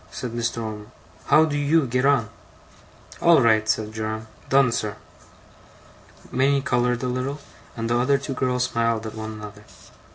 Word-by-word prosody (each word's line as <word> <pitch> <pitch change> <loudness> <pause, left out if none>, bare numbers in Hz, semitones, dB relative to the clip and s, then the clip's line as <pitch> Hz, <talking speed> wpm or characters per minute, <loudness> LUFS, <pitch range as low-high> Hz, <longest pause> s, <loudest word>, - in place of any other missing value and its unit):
said 125 - -6
Mr. 115 0 -2
Omer. 105 -1 -6 0.4
'How 155 +1 +6
do 150 -2 -3
you 145 +1 +2
get 125 +2 +1
on?' 120 -7 +2 0.9
'All 170 -2 +6
right,' 110 -3 +3
said 110 0 0
Joram. 110 0 -4 0.2
'Done, 135 -2 +4
sir.' 105 -3 -2 1.4
Minnie 135 +2 +2
coloured 125 0 0
a - - 0
little, 130 +3 -2 0.4
and 115 0 -2
the 120 +1 +1
other 140 +3 +3
two 135 0 -5
girls 125 -1 0
smiled 115 -3 0
at 110 - -6
one 110 0 -6
another. 105 -1 -10
120 Hz, 160 wpm, -23 LUFS, 110-135 Hz, 1.4 s, How